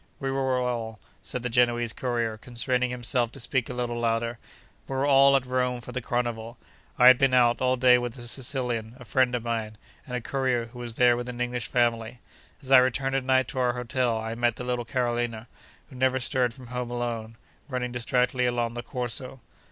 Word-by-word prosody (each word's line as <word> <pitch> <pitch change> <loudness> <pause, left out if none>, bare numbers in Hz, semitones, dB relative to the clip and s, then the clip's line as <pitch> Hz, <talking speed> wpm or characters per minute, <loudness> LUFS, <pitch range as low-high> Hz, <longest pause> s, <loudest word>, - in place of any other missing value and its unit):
We 135 0 -2
were 135 -1 0
all 115 -3 -3 0.2
(said 125 -2 -4
the 125 - -1
Genoese 120 -1 +2
courier, 120 -3 -1
constraining 125 +2 -1
himself 120 -1 -1
to - - -9
speak 130 0 -1
a - - -4
little 120 -1 -2
louder), 115 0 -1 0.5
we 135 - -4
were 135 +1 +1
all 140 -1 +6
at 135 -2 +2
Rome 125 -1 0
for 120 +1 -9
the 130 +1 -3
Carnival. 120 -1 -3 0.4
I 125 - +5
had 130 0 +9
been 135 -2 +3
out, 120 -1 +4
all 130 0 +3
day, 125 -1 +5
with 120 0 -5
a 120 - -8
Sicilian, 120 -2 -3
a 125 - -12
friend 125 +1 +2
of 120 - -3
mine, 110 -2 -3 0.3
and 125 - -4
a - - -1
courier, 130 -2 0
who 120 +1 -12
was 120 -2 -6
there 120 -1 +5
with 120 +1 -4
an 120 0 -7
English 125 -1 -2
family. 120 -1 0 0.4
As 135 - -7
I 135 - +10
returned 130 +1 +1
at 135 - 0
night 130 -1 +2
to 130 - -4
our 125 -1 +2
hotel, 125 -1 -1
I 110 0 -4
met 120 0 +1
the 125 - -7
little 125 -1 -2
Carolina, 120 -2 -2 0.4
who - - -11
never 130 +1 +2
stirred 125 -1 +1
from 125 0 -13
home 125 -1 -3
alone, 120 -2 -4 0.3
running 125 -2 -2
distractedly 125 +1 +1
along 120 -1 -1
the 120 - -4
Corso. 125 +1 -5
125 Hz, 210 wpm, -26 LUFS, 120-130 Hz, 0.5 s, I